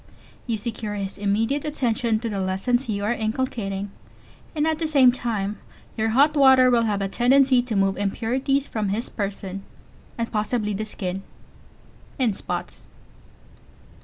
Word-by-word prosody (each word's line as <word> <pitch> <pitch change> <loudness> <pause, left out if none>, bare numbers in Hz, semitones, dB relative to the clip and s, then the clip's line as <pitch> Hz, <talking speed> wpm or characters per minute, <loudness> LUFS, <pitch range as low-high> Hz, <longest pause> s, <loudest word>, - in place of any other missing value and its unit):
You 230 -2 0
secure 215 -1 -4
his 195 -1 -5
immediate 225 +8 0
attention 240 -6 0
to 235 - -2
the 200 -2 -3
lessons 195 +7 0
you 200 -1 -1
are 215 +4 +1
inculcating, 215 -4 -3 0.6
and 300 0 +1
at 315 -1 0
the 325 - 0
same 275 -5 +6
time 215 -5 -3 0.4
your 220 0 0
hot 285 +7 +4
water 265 -2 +6
will 235 -1 +3
have 205 -2 0
a - - 0
tendency 255 +4 +4
to 240 -3 -4
move 195 -1 +2
impurities 255 +7 0
from 215 -6 -2
his 215 +5 -2
person, 195 -2 -4 0.6
and 230 -1 -3
possibly 210 0 -1
the 215 +2 -3
skin, 190 -3 -4 1.0
in 245 -6 +2
spots. - - -6
225 Hz, 150 wpm, -24 LUFS, 200-255 Hz, 1.0 s, same